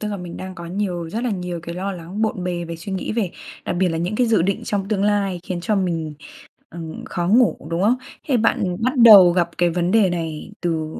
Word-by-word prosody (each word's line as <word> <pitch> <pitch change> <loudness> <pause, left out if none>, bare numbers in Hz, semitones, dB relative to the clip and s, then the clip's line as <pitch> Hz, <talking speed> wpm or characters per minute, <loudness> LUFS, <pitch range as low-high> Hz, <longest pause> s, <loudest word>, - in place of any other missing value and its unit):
tức 210 - -3
là 205 - -3
mình 180 -2 -8
đang 185 0 -7
có 170 -2 -8
nhiều 180 -2 -3
rất 230 +7 -3
là 245 - 0
nhiều 180 -3 -4
cái 170 0 -6
lo 195 +2 -3
lắng 180 +4 -6
bộn 215 -4 -1
bề 175 -1 -2
về 165 0 -6
suy 190 +4 -7
nghĩ 190 - -3
về 215 -6 -1 0.3
đặc 175 - -2
biệt 185 - +3
là 165 -1 -2
những 180 +5 -2
cái 245 0 +2
dự 220 -7 +3
định 195 +2 -1
trong 195 -2 -2
tương 205 -2 0
lai 200 -4 0
khiến 180 -1 -4
cho 210 +3 0
mình, 165 -5 -2 0.6
ừm, 165 -1 -8
khó 175 -1 -3
ngủ, 240 +3 +4
đúng 170 +2 -1
không? 225 +5 +3 0.3
Thế 265 - +3
bạn 190 -5 +1
bắt 255 +3 +2
đầu 210 -7 +9
gặp 170 -1 +1
cái 175 -1 +3
vấn 175 +1 0
đề 215 -3 +4
này 165 -1 -4
từ 165 -3 -1
180 Hz, 250 wpm, -21 LUFS, 170-205 Hz, 0.6 s, đầu